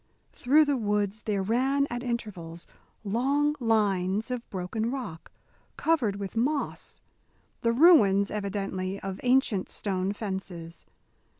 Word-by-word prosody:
Through 295 Hz, +5 st, +4 dB
the 285 Hz, -2 st, +1 dB
woods 210 Hz, -1 st, -1 dB
there 200 Hz, -3 st, -1 dB
ran 265 Hz, +7 st, +1 dB
at 240 Hz, 0 st, -3 dB
intervals 200 Hz, -9 st, -5 dB, 0.4 s
long 275 Hz, +8 st, +1 dB
lines 210 Hz, -2 st, +1 dB
of 245 Hz, -1 st, -5 dB
broken 200 Hz, +5 st, -3 dB
rock, 245 Hz, -12 st, -6 dB, 0.5 s
covered 275 Hz, -12 st, +1 dB
with 200 Hz, 0 st, -6 dB
moss 280 Hz, +6 st, -2 dB, 0.6 s
the 230 Hz, -, +2 dB
ruins, 230 Hz, -, +5 dB
evidently, 195 Hz, -2 st, -3 dB
of 195 Hz, -1 st, -5 dB
ancient 250 Hz, -6 st, +2 dB
stone 190 Hz, -1 st, -2 dB
fences. 190 Hz, -5 st, -6 dB
210 Hz, 115 wpm, -27 LUFS, 195-250 Hz, 0.6 s, ruins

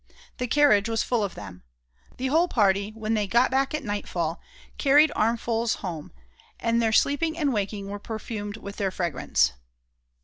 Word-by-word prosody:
The 250 Hz, -, -1 dB
carriage 230 Hz, -6 st, +4 dB
was 225 Hz, -1 st, 0 dB
full 240 Hz, -4 st, 0 dB
of 200 Hz, -, -4 dB
them. 95 Hz, -3 st, -10 dB, 0.6 s
The 255 Hz, -, -3 dB
whole 330 Hz, +5 st, +3 dB
party, 200 Hz, -, +2 dB
when 220 Hz, 0 st, -2 dB
they 210 Hz, -2 st, 0 dB
got 240 Hz, +6 st, +3 dB
back 270 Hz, +2 st, +1 dB
at 305 Hz, -, -4 dB
nightfall, 180 Hz, -6 st, -3 dB, 0.4 s
carried 295 Hz, +2 st, +5 dB
armfuls 230 Hz, +1 st, 0 dB
home, 170 Hz, -6 st, -6 dB, 0.5 s
and 230 Hz, 0 st, +1 dB
their 225 Hz, -1 st, +2 dB
sleeping 315 Hz, +7 st, +2 dB
and 290 Hz, -5 st, +1 dB
waking 200 Hz, -1 st, -3 dB
were 205 Hz, +1 st, -6 dB
perfumed 210 Hz, -1 st, -6 dB
with 200 Hz, -2 st, -9 dB
their 195 Hz, -2 st, 0 dB
fragrance. 135 Hz, -, 0 dB
220 Hz, 165 wpm, -25 LUFS, 200-250 Hz, 0.6 s, carried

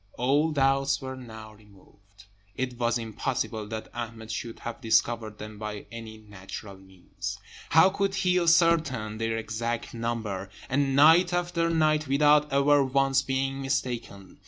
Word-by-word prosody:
All 140 Hz, +6 st, +2 dB
doubts 135 Hz, -1 st, +2 dB
were 130 Hz, -1 st, -6 dB
now 110 Hz, -4 st, -10 dB
removed. 100 Hz, -1 st, -21 dB, 0.3 s
It 125 Hz, -2 st, -4 dB
was 120 Hz, 0 st, +1 dB
impossible 115 Hz, -1 st, -3 dB
that 110 Hz, 0 st, -6 dB
Ahmed 115 Hz, -2 st, -6 dB
should 115 Hz, -2 st, -6 dB
have 120 Hz, +2 st, -6 dB
discovered 115 Hz, -2 st, +1 dB
them 105 Hz, 0 st, -9 dB
by 105 Hz, -1 st, -6 dB
any 115 Hz, -1 st, -8 dB
natural 100 Hz, -1 st, -10 dB
means. 95 Hz, -1 st, -8 dB, 0.3 s
How 160 Hz, +5 st, +6 dB
could 195 Hz, 0 st, -1 dB
he 180 Hz, -1 st, +2 dB
ascertain 165 Hz, -10 st, +2 dB
their 115 Hz, 0 st, -1 dB
exact 115 Hz, +1 st, -3 dB
number? 115 Hz, -5 st, -3 dB, 0.2 s
and 135 Hz, 0 st, +1 dB
night 165 Hz, +5 st, +6 dB
after 175 Hz, -1 st, 0 dB
night, 155 Hz, -2 st, +2 dB
without 150 Hz, +2 st, +4 dB
ever 140 Hz, +1 st, +4 dB
once 135 Hz, 0 st, +2 dB
being 135 Hz, 0 st, -2 dB
mistaken? 125 Hz, -8 st, -4 dB
125 Hz, 140 wpm, -27 LUFS, 110-145 Hz, 0.3 s, How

